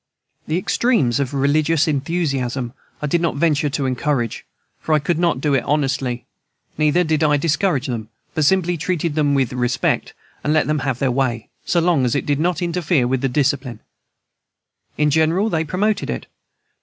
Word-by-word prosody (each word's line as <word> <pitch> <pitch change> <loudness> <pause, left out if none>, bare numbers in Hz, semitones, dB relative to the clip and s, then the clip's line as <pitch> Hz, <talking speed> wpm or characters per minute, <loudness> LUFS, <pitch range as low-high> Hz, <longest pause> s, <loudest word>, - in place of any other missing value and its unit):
The 155 - 0
extremes 180 - +1
of 135 -3 -1
religious 145 +3 +2
enthusiasm 135 -5 -1 0.3
I - - +1
did 165 +4 +1
not 170 -3 0
venture 150 -1 +2
to 140 -1 -2
encourage, 130 -2 -1 0.3
for 160 - -1
I - - +6
could 155 +3 -1
not 170 -6 +1
do 145 +1 0
it 135 - +2
honestly; 135 -4 -1 0.5
neither 155 +4 +3
did 160 -1 +1
I 150 -1 +4
discourage 155 -1 +1
them, 115 -4 -4 0.2
but 155 - 0
simply 175 +2 +2
treated 170 -1 -1
them 145 -2 +2
with 130 -3 +1
respect, 125 0 0 0.3
and 150 - +1
let 155 - +3
them 150 0 0
have 135 -3 -1
their 130 0 +1
way, 120 -3 -1 0.2
so 175 - +2
long 165 -5 +2
as 120 -2 +1
they - - +1
did 145 -1 -1
not 175 +1 0
interfere 170 -6 +1
with 130 0 0
discipline. 130 -4 0 1.2
In 150 0 +2
general 165 +8 +2
they 160 -1 +1
promoted 200 +7 -1
it. 60 - -4
150 Hz, 175 wpm, -20 LUFS, 130-165 Hz, 1.2 s, I